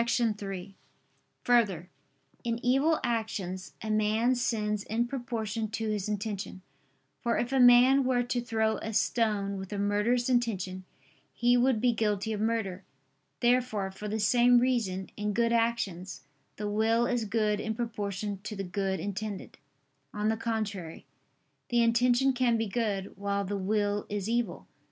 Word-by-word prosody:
3: 205 -5 -1 0.7
Further, 195 -8 +2 0.5
in 230 -1 -1
evil 275 +6 +3
actions, 210 -6 -3
a 215 - -2
man 215 +3 +2
sins 210 -4 -1
in 230 +2 0
proportion 230 -4 -3
to 220 +1 -3
his 210 -1 -2
intention: 205 -3 -4 0.6
for 235 - 0
if 245 - -1
a 270 - +2
man 250 +2 +7
were 250 -1 +2
to 245 0 -1
throw 220 -2 0
a 220 - -5
stone 210 -2 +1
with 190 +1 -8
a 205 - -3
murderous 210 +5 +1
intention, 195 -7 -1 0.5
he 240 +1 +3
would 245 -1 +3
be 245 +2 +3
guilty 215 -1 0
of 210 - -3
murder. 215 -4 -1 0.6
Therefore, 240 -5 +1
for 210 +2 -7
the 215 +1 -2
same 245 +3 +5
reason, 230 -7 0
in 210 0 -1
good 230 +2 +2
actions, 225 -6 -1 0.3
the 210 - -4
will 220 +3 +2
is 240 -2 0
good 210 -1 0
in 220 +1 -3
proportion 205 -3 -3
to 210 +1 -6
the 195 - -4
good 190 +1 -2
intended. 205 0 -5 0.6
On 210 +1 0
the 220 - +1
contrary, 215 -7 -4 0.6
The 240 -1 +3
intention 245 +3 +3
can 245 -2 +2
be 225 - 0
good, 205 -3 -2
while 200 0 -1
the 205 +2 -3
will 205 +1 0
is 205 -1 -3
evil. 235 +1 -1
220 Hz, 150 wpm, -29 LUFS, 200-240 Hz, 0.7 s, man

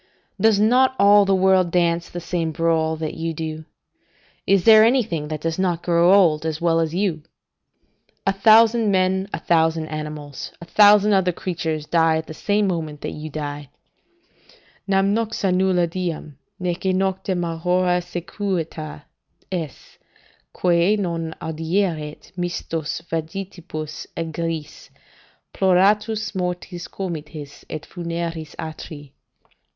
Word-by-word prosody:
] 195 - -16
"Does 220 -1 +4
not 255 +5 +4
all 205 0 +6
the 195 0 +3
world 190 -1 +3
dance 170 -1 +1
the 175 - -6
same 170 -1 -2
brawl 160 -1 +1
that 155 -1 -4
you 165 0 -4
do? 155 0 -5 0.8
Is 195 -2 +4
there 220 -1 +8
anything 220 - +1
that 155 -1 -5
does 165 +2 -2
not 175 -3 0
grow 170 +1 +4
old, 170 -6 +4
as 160 -1 -3
well 165 -1 +2
as 165 0 -1
you? 180 -5 0 1.0
A 195 - +2
thousand 220 +2 +5
men, 190 0 +1
a - - -2
thousand 160 -1 +1
animals, 150 -2 -6
a 170 - -10
thousand 210 +2 +6
other 190 -2 +3
creatures, 160 -4 -3
die 165 0 +3
at 160 - -4
the 155 - -8
same 205 +5 0
moment 155 -5 -3
that - - -4
you 155 +1 -7
die: 145 -1 -6 1.2
"'Nam 195 0 +2
nox 220 -1 -2
nulla 185 -1 +2
diem, 170 -4 -4 0.2
neque 185 +1 -1
noctem 190 -1 -1
aurora 180 +2 +1
sequuta 175 -4 -4 0.5
est, 165 -7 -6 0.5
Quae 175 +3 +2
non 165 -4 -3
audierit 160 -1 -2
mistos 165 -3 -3
vagitibus 165 -2 -5
aegris 165 -1 -4 0.6
Ploratus, 210 +4 +2
mortis 180 -1 -4
comites 155 -5 -7
et 155 - -5
funeris 170 -2 -5
atri. 155 -3 -8
170 Hz, 130 wpm, -22 LUFS, 160-190 Hz, 1.2 s, there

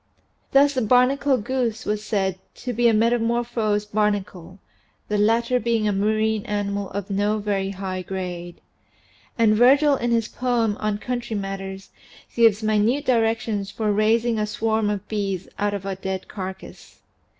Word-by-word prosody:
Thus 280 +1 +5
the 260 - 0
barnacle 255 +4 +3
goose 235 -1 -2
was 210 0 -2
said 190 -4 -1 0.2
to 250 - -5
be 240 +1 +3
a - - +5
metamor 230 +2 +2
phosed 215 -3 -1
barnacle, 195 -4 -1 0.5
the 210 0 0
latter 235 +4 +2
being 230 -2 0
a - - +2
marine 215 +1 +1
animal 200 -1 -2
of 200 0 -5
no 205 +2 +1
very 200 -2 -1
high 190 -1 -4
grade. 180 -2 -6 0.8
And 220 -2 +4
Virgil 275 +5 +5
in 240 0 -1
his 230 -2 +1
poem 240 -4 0
on 215 -1 -1
country 240 0 -4
matters 195 -1 -5 0.4
gives 225 -2 +4
minute 215 +7 +1
directions 225 -4 0
for 210 0 -1
raising 220 +2 +2
a 210 - 0
swarm 220 0 0
of 205 -2 -3
bees 195 -4 -3
out 205 0 0
of 195 -1 -6
a 195 -1 -3
dead 190 0 -5
carcass. 190 -1 -9
215 Hz, 155 wpm, -23 LUFS, 200-235 Hz, 0.8 s, Thus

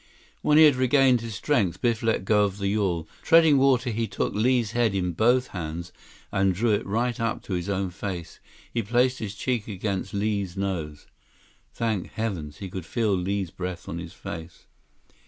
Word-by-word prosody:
When 150 - +4
he 160 - +9
had 145 -4 +6
regained 130 -1 +4
his 115 -2 -6
strength, 100 - 0
Biff 120 -2 +1
let 115 -4 0
go 105 0 +4
of 100 -1 -1
the 100 -1 -1
yawl. 95 -6 0
Treading 160 -4 +6
water, 130 -2 +3
he 115 +1 -1
took 95 - -2
Li's 120 0 +2
head 115 -4 +1
in 90 -2 0
both 120 +8 +2
hands 85 -1 -5 0.4
and 95 -1 +2
drew 115 +4 +1
it 105 - +1
right 120 +4 -1
up 115 0 -1
to 95 - -5
his 90 +2 -2
own 95 -2 -1
face. 90 -3 -6 0.3
He 115 - +1
placed 125 +4 +1
his 105 -3 -5
cheek 120 0 -2
against 100 -1 -3
Li's 100 -3 -2
nose. 85 -7 -3 0.7
Thank 110 -5 -2
heavens! 90 -10 -4
He 95 - -6
could 95 -1 -6
feel 110 -4 +1
Li's 95 0 -1
breath 90 -1 -6
on 85 - -4
his 85 -1 -8
face. 80 0 -8
100 Hz, 185 wpm, -26 LUFS, 95-120 Hz, 0.7 s, he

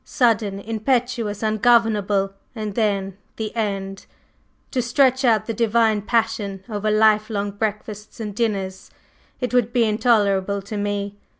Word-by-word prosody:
Sudden, 220 -6 +1
impetuous, 225 0 -1
ungovernable, 215 -3 +2 0.2
and 215 -2 -4
then 200 -3 0 0.2
the 220 0 -5
end! 195 -3 -3 0.6
To 255 - 0
stretch 260 +2 +2
out 220 -4 +3
the 230 - -3
divine 225 -1 +2
passion 210 -3 -1
over 215 -1 -2
life 215 0 +3
long 205 -2 -2
breakfasts 210 +1 -5
and 210 -2 -4
dinners! 195 -4 -2 0.5
It 250 0 -2
would 240 -2 +2
be 240 -1 +3
intolerable 205 -3 +2
to 200 +2 -7
me. 205 0 -3
215 Hz, 130 wpm, -22 LUFS, 200-230 Hz, 0.6 s, out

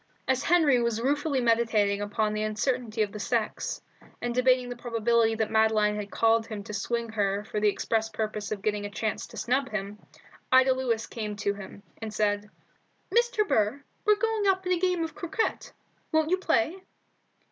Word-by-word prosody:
As 260 0 +2
Henry 310 -8 +4
was 235 -1 0
ruefully 285 +2 0
meditating 225 -4 +2
upon 210 +1 -1
the 215 - -2
uncertainty 220 +1 0
of 205 - -4
the 210 - -7
sex, 225 +1 -1 0.4
and 240 0 -2
debating 250 0 +3
the 245 - -5
probability 230 -1 +1
that 220 -1 -1
Madeline 220 -1 +3
had 205 -1 -5
called 225 +1 +2
him 210 -2 -6
to 210 - -8
swing 235 +3 -2
her 205 -2 0
for 210 0 -3
the 210 0 +4
express 220 +2 -1
purpose 215 -1 -4
of 200 -2 -4
getting 210 -1 0
a 205 - -4
chance 215 +1 -3
to - - -12
snub 265 +3 0
him, 205 0 -4 0.5
Ida 260 0 +6
Lewis 240 -4 -1
came 210 -2 -5
to 200 0 -1
him, 200 0 -10 0.2
and 220 -1 -4
said 210 -1 0 0.6
"Mr. 475 -2 +2
Burr, 220 - +1 0.2
we're 425 0 +5
getting 440 -1 0
up 380 -1 +2
a 365 -1 +1
game 360 -2 +1
of 320 - -4
croquet. 410 +3 -2 0.4
Won't 315 +1 +2
you 370 - +4
play?" 335 +1 0
225 Hz, 180 wpm, -27 LUFS, 210-265 Hz, 0.6 s, Ida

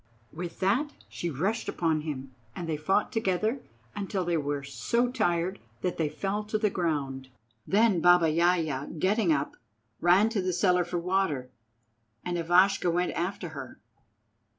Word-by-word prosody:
With 170 +2 -6
that 245 +11 +1 0.2
she 175 - -4
rushed 190 - -1
upon 160 -3 0
him, 135 -4 -6 0.2
and 175 - -5
they 160 - -1
fought 190 +7 +1
together 220 +4 0 0.3
until 195 -2 -2
they 175 0 +1
were 145 -2 -1
so 140 - 0
tired 175 -5 0 0.2
that 180 - -2
they 160 -2 0
fell 200 +6 -2
to 215 +1 -1
the 210 -2 +1
ground. 140 -7 -2 0.4
Then 205 -3 +3
Baba 175 -2 +5
Yaja, 165 -4 +1
getting 195 +2 +2
up, 145 -1 -1 0.4
ran 185 +6 +5
to 220 -3 -1
the 185 0 -1
cellar 180 0 +3
for 175 +1 -3
the - - -8
water, 170 -9 0 0.7
and 175 - -2
Ivashka 175 +2 +3
went 175 +1 +1
after 175 0 -3
her. 140 -5 -9
175 Hz, 155 wpm, -28 LUFS, 155-195 Hz, 0.7 s, Baba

